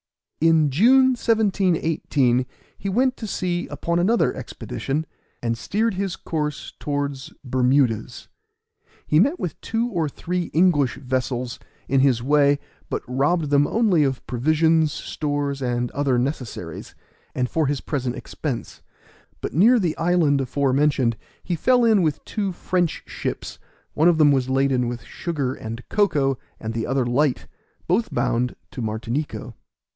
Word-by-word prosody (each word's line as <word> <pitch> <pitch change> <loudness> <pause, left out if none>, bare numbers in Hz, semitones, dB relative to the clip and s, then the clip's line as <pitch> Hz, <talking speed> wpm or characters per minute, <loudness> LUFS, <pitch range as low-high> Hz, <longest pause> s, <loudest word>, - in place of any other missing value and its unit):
In 160 -2 +4
June, 255 - +5
1718, 175 - +1 0.3
he 200 - -4
went 255 +6 +2
to 220 - -6
sea 175 -3 -2
upon 170 0 -1
another 220 +7 +2
expedition, 150 +4 -4 0.4
and 115 -1 0
steered 215 - -1
his 190 -1 -2
course 150 -2 -4
towards 145 0 -3
Bermudas. 125 -2 +1 0.8
He 150 - +3
met 285 - +3
with 175 - -4
two 230 +2 -1
or 170 -8 -1
three 175 +5 -3
English 155 -7 +2
vessels 125 -2 -3 0.3
in 135 - +2
his 130 -3 +3
way, 145 +1 +4 0.3
but - - -3
robbed 145 +5 +1
them 145 0 +4
only 210 -9 +3
of 135 -2 -1
provisions, 155 +5 +2
stores, 145 -2 -3
and 120 -1 -1
other 140 -3 +1
necessaries, 120 - -4 0.5
for 155 +2 0
his 140 -1 0
present 130 -4 -2
expense; 135 -7 -5 0.6
but - - -5
near 225 - +6
the 175 -8 0
island 165 -4 +3
before 135 0 0
mentioned, 135 -4 +2 0.3
he 175 - -1
fell 245 +8 +3
in 220 -4 +5
with 155 -4 -1
two 200 -3 -2
French 175 -1 -1
ships, - - -5 0.3
one 160 +3 +3
of 175 -2 +4
them 150 -2 +6
was 130 -2 +1
laden 130 -2 +2
with 120 -1 -5
sugar 140 -3 -3
and 115 -1 -7
cocoa, 145 -10 +1 0.2
and 110 0 -4
the 115 -1 -2
other 135 0 +1
light, 130 +3 +1 0.4
both 205 +7 +1
bound 125 +1 0 0.2
to 125 - -6
Martinico. 115 +6 -3
145 Hz, 140 wpm, -23 LUFS, 130-175 Hz, 0.8 s, near